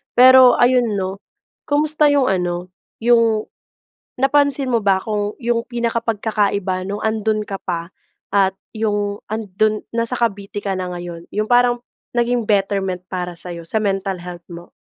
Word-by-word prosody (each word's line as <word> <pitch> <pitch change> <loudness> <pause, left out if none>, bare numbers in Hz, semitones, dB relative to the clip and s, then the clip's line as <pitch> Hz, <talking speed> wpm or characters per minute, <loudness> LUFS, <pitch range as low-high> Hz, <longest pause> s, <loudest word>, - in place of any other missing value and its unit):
Pero 255 0 +8
ayun 245 -3 +3
'no, 190 0 -3 0.5
kumusta 300 0 +3
'yong 285 -3 +3
ano, 180 -1 -2 0.3
'yong 230 -2 +4 0.8
napansin 275 -1 +2
mo 235 - +3
ba 190 -1 +3
kung 210 -1 -2
'yong 235 0 0
pinaka 235 -1 -1
pagkakaiba 200 -4 -1
nung 200 +2 -4
andun 220 -1 0
ka 195 -2 -5
pa, 170 -2 -4 0.4
at 195 -1 +2 0.2
'yong 205 -2 -1
ando'n 215 0 -1
nasa 230 +1 -1
Cavite 205 -4 -2
ka 195 -2 -2
na 180 -1 -4
ngayon, 175 -1 -7
'yong 215 +2 -1
parang 245 0 +3 0.3
naging 240 -1 +1
betterment 195 -3 0
para 180 -1 -4
sa'yo, 170 -1 -7
sa 215 +5 -1
mental 195 -2 -2
health 175 -1 -9
mo? 170 0 -11
210 Hz, 145 wpm, -19 LUFS, 190-235 Hz, 0.8 s, Pero